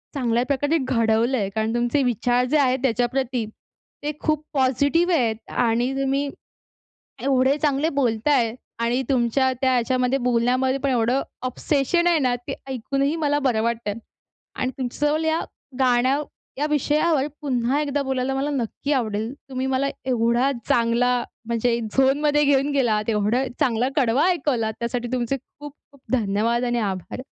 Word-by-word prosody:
चांगल्या 240 -3 +1
प्रकारे 290 +3 +1
घडवलं 235 -2 +1
आहे. 200 -4 -1
कारण 220 +2 -2
तुमचे 240 +4 +1
विचार 245 0 +1
जे 305 - +4
आहेत 260 -2 +2
त्याच्याप्रती 245 0 0 0.6
ते 295 - -1
खूप 310 -1 0
पॉझिटिव्ह 285 +6 +2
आहेत 235 -7 +1
आणि 240 +2 +1
तुम्ही 275 +1 0 0.9
एवढे 265 0 +3
चांगले 295 +1 +2
बोलत 225 0 0
आहे 240 -6 +2 0.3
आणि 245 +3 +1
तुमच्या 260 +1 +2
त्या 260 -1 +2
याच्या 250 +1 +1 0.2
बोलण्यात 250 +2 +1
पण 280 - +1
एवढं 245 +1 +2 0.3
ऑब्सेशन 295 +6 0
आहे 345 -2 +4
ना, 255 -4 +1
ते 275 - -3
ऐकून 265 +2 -2
ही 285 +4 +1
मला 290 -2 +1
बरं 250 -6 +1
वाटतं. 230 -2 -2 0.6
आणि 255 - -1
तुमच्याजवळ 295 +4 0
या 320 +1 +1 0.4
गाण्या 255 +2 +3 0.4
या 295 - +1
विषयावर 300 0 +2 0.2
पुन्हा 260 0 0
एकदा 285 -1 -1
बोलायला 265 0 -1
मला 275 +2 -1
नक्की 275 +1 -2
आवडेल. 220 -3 -1 0.2
तुम्ही 260 0 -2
मला 265 +1 0 0.2
एवढा 240 +2 +2 0.2
चांगला 235 +1 +2 0.3
म्हणजे 235 0 0
झोनमध्ये 275 +6 +2
घेऊन 280 0 +2
गेलात, 230 -6 +1
एवढा 215 +4 +1 0.2
चांगला 250 -3 +2
कडवा 265 +2 +3
ऐकवलात, 270 -11 0
त्यासाठी 240 +1 -3
तुमचे 250 +1 0
खूप 290 +2 -12 0.2
खूप 280 - -20
धन्यवाद 230 +1 +1
आणि 240 0 0
आभार. 195 +1 -3
255 Hz, 145 wpm, -23 LUFS, 235-280 Hz, 0.9 s, जे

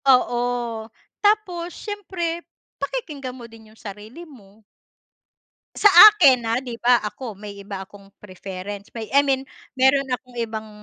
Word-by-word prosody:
Oo. 245 -1 -1 0.8
Tapos 370 -5 +1
siyempre, 355 -5 -5 0.4
pakikinggan 295 - -5
mo 245 -2 -10
din 220 -1 -16
yung 220 - -23
sarili 215 - -10
mo. 215 -6 -18 1.1
Sa - - +1 0.2
akin 290 -12 +5
ah, 230 - +1
'di 245 -4 -8
ba 245 0 +5
ako 215 -1 -7
may 205 -1 -9
iba 195 -1 -7
akong 200 -1 -17
preference, 195 +1 -9 0.2
I 280 - +6
mean 270 -1 -1 0.3
meron 265 +1 +3
akong 250 0 -5
ibang, 220 -1 -6
245 Hz, 135 wpm, -22 LUFS, 210-300 Hz, 1.1 s, I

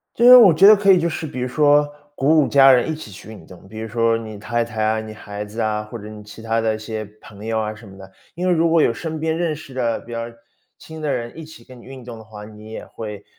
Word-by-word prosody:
就 235 - +1
是 250 +1 +10
我 220 -8 +8
觉 170 +5 +5
得 215 - +9
可 200 -1 +4
以 185 - +4
就 170 0 0
是 160 -1 -5
比 130 -4 -7
如 125 - -2
说， 145 +2 +3 0.3
鼓 155 +4 +3
舞 145 - 0
家 135 -1 +6
人 125 +4 +2
一 - - -2
起 155 -8 -10
去 100 +2 -13
运 110 -1 -12
动， 95 +1 -15
比 110 +2 -10
如 110 - -5
说 115 +1 +1
你 110 -2 -9
太 120 +3 -2
太 110 -2 -5
啊， 110 0 0
你 110 0 -9
孩 105 -1 -8
子 105 +3 -8
啊， 105 -1 -1
或 105 +3 -10
者 105 0 -10
你 105 -1 -11
其 105 +2 -13
他 115 0 -1
的 110 -1 0
一 - - -6
些 110 0 -6 0.2
朋 105 0 -13
友 110 0 -2
啊 110 0 -4
什 110 0 -14
么 95 - -14
的。 95 0 -13 0.2
因 180 +2 -4
为 - - +3
如 165 0 +2
果 165 -1 +3
有 - - +2
身 160 +5 -6
边 160 0 -1
认 170 -3 -1
识 145 -3 -12
的 120 -3 -2
比 120 - -16
较 115 0 -4 0.5
亲 160 0 -12
的 150 -2 -2
人 120 0 -5
一 160 - -8
起 155 -6 -14
跟 130 0 -15
你 - - -17
运 130 -1 -11
动 120 -2 -9
的 110 - -13
话， 105 -1 -11
你 105 +1 -13
也 - - -7
会 105 -2 -9
115 Hz, 325 characters per minute, -20 LUFS, 110-155 Hz, 0.5 s, 是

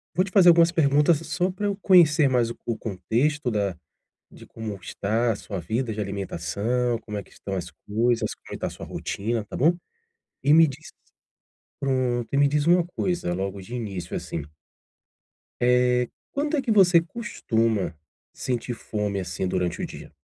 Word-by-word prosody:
vou 185 - +3
te 190 - -9
fazer 190 -4 +6
algumas 170 0 +6
perguntas 150 0 +4
só 180 +3 -1
para 205 +3 -3
eu 200 -1 -1
conhecer 170 -7 +5
mais 120 -3 +2
o - - -7
o 115 - -1
contexto 120 +7 -1
da 100 -4 -1 0.6
de - - -13
como 110 -2 -6
está 110 +5 -1
a - - -1
sua 100 -2 -6
vida 110 +8 -2
de 105 - -7
alimentação, 100 +5 -1
como 105 -2 -6
é 100 - -4
que - - -23
estão 100 -1 -6
as 85 -2 -4 0.2
coisas, 115 +3 +1
como - - -12
está - - -3
a - - -3
sua - - -9
rotina, 110 +2 -3
tá - - -7
bom? 165 +6 +4 0.7
E 145 +2 +5
me 165 0 +8
diz 150 +3 -8 0.9
pronto, 130 -3 0
e - - +1
me 140 0 +5
diz 150 +1 0
uma 175 0 +5
coisa 175 - -2
logo 95 +2 -3
de 120 +7 -6
início, 100 -7 -5
assim. 80 - -4 1.2
Eh, 125 0 +3 0.2
quando 295 +2 0
é 275 - 0
que 235 -4 +1
você 180 -4 +6
costuma 115 - -1 0.4
sentir 125 -1 -3
fome, 105 -3 -3
assim, 90 0 -3
durante 90 -1 -1
o - - -1
dia? - - -11
120 Hz, 180 wpm, -25 LUFS, 105-160 Hz, 1.2 s, me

